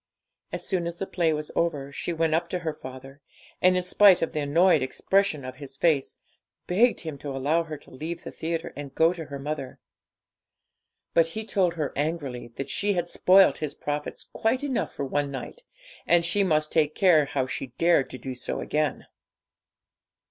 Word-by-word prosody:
As - - -4
soon 180 -3 -1
as 170 0 -5
the 195 - -3
play 170 -4 +1
was 150 0 -3
over, 145 -5 -1
she 160 - -4
went 165 -1 +1
up 170 +1 0
to 180 - -1
her 160 - 0
father, 135 +2 -11 0.4
and, 185 0 +5
in 180 - 0
spite 190 0 +6
of - - -1
the 155 - -2
annoyed 160 +3 +4
expression 155 +2 0
of 130 - -7
his 135 -2 -10
face, 150 -3 +1 0.5
begged 225 +7 +3
him 155 -4 -6
to 145 - -6
allow 140 +5 +1
her 155 -2 -6
to - - -18
leave 160 +6 -6
the - - -7
theatre 165 0 -4
and 145 -1 -6
to 135 - -34
go 165 +2 +4
to 165 -3 -6
her 140 -1 -7
mother. 140 -2 -5 1.4
But 165 -1 +4
he 215 +7 -5
told 185 -6 +1
her 150 -4 -2
angrily 145 -5 -3
that 135 0 -5
she 205 0 0
had 175 -2 -1
spoilt 190 +2 +5
his 155 -2 -4
profits 150 0 -4
quite 245 +5 0
enough 270 -4 -1
for 140 - -4
one 145 +1 -1
night, 140 - -7 0.5
and 170 -1 +4
she 200 +4 +2
must 155 -4 +1
take 155 -2 +2
care 170 -6 +5
how 135 -2 -1
she 135 0 -4
dared 165 -5 +3
to - - -7
do 130 0 -6
so 125 - -4
again. 150 -1 -1
160 Hz, 195 wpm, -26 LUFS, 140-175 Hz, 1.4 s, spite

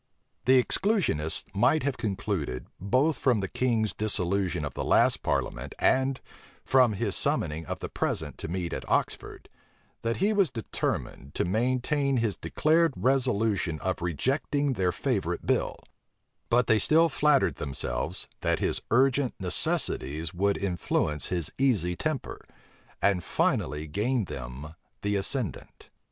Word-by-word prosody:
The 130 0 +6
exclusionists 180 - 0
might 125 +10 +3
have 140 -1 0
concluded, 95 - -3
both 130 - +2
from 125 -4 +3
the 95 -2 -2
king's 115 -1 0
dissolution 95 -6 0
of 70 - -5
the - - -3
last - - +3
parliament, - - -2
and 130 0 +2 0.5
from 125 -4 +4
his 100 -2 -1
summoning 80 0 0
of - - -5
the - - -3
present - - -3
to - - -4
meet 85 0 -3
at - - -5
Oxford, - - -1 0.5
that 115 0 -1
he 205 +4 +2
was 200 -6 +3
determined 110 - -4
to - - +1
maintain 130 - +1
his 115 -4 0
declared 160 0 +2
resolution 105 - +1
of 95 -2 -2
rejecting 135 - 0
their 95 -5 +1
favorite - - -2
bill; - - 0 0.7
but 120 +1 +4
they 110 -2 +4
still 165 +7 +4
flattered 150 -2 +2
themselves, 65 -4 -2
that - - +1
his - - -1
urgent 130 +2 +3
necessities 80 -3 -1
would 100 +3 +1
influence 85 -5 -1
his 85 -4 -2
easy 100 -11 +2
temper, 155 - -3 0.6
and 95 -4 +3
finally 75 0 0
gain 105 - 0
them 65 +2 -7 0.3
the 100 0 0
ascendant. 100 - -3
105 Hz, 135 wpm, -28 LUFS, 90-130 Hz, 0.7 s, The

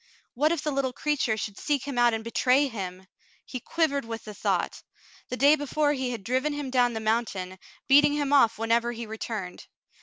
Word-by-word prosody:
What 300 +5 +2
if 340 -4 -1
the 300 - -1
little 270 -2 -1
creature 270 -6 0
should 205 -1 -5
seek 285 -3 0
him 280 - -4
out 240 0 +5
and 220 - -5
betray 255 +4 +2
him! 190 -6 -6 0.4
He 255 - -6
quivered 285 +1 0
with 225 -1 -6
the 210 - -8
thought. 205 - -1 0.5
The 250 - -3
day 285 +3 +6
before 290 0 0
he 260 -3 -2
had 235 -5 -5
driven 260 +7 0
him 290 -3 -4
down 245 -2 +3
the 220 - -3
mountain, 215 -5 -2 0.3
beating 290 +1 +6
him 290 -1 0
off 235 -5 +5
whenever 230 +2 +1
he 235 0 -6
returned. 215 -4 -6
245 Hz, 200 wpm, -27 LUFS, 225-285 Hz, 0.5 s, day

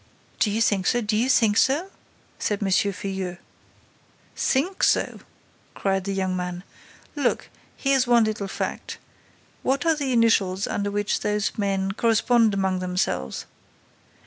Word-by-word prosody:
"Do 215 - +3
you 215 +2 -1
think 195 -4 +1
so? 240 - +2
Do 215 -1 -1
you 235 +4 +1
think 225 -4 +4
so?" 320 +9 +2 0.5
said 210 -1 -1
M. 195 - 0
Filleul. 190 -2 -1 1.0
"Think 340 +9 0
so!" - - +2 0.6
cried 195 -1 -1
the 200 - -2
young 190 -1 -1
man. 180 0 -4 0.5
"Look, 280 -4 -1 0.3
here's 270 -2 +2
one 240 -1 +5
little 215 -2 -2
fact: - - -4 0.6
what 275 +5 0
are 325 -1 +4
the 280 -3 -2
initials 200 -5 +2
under 205 0 -2
which 205 0 -1
those 210 -1 -1
men 195 -2 -1
correspond 225 0 +3
among 190 -1 0
themselves? 180 - -2
205 Hz, 140 wpm, -24 LUFS, 190-240 Hz, 1.0 s, one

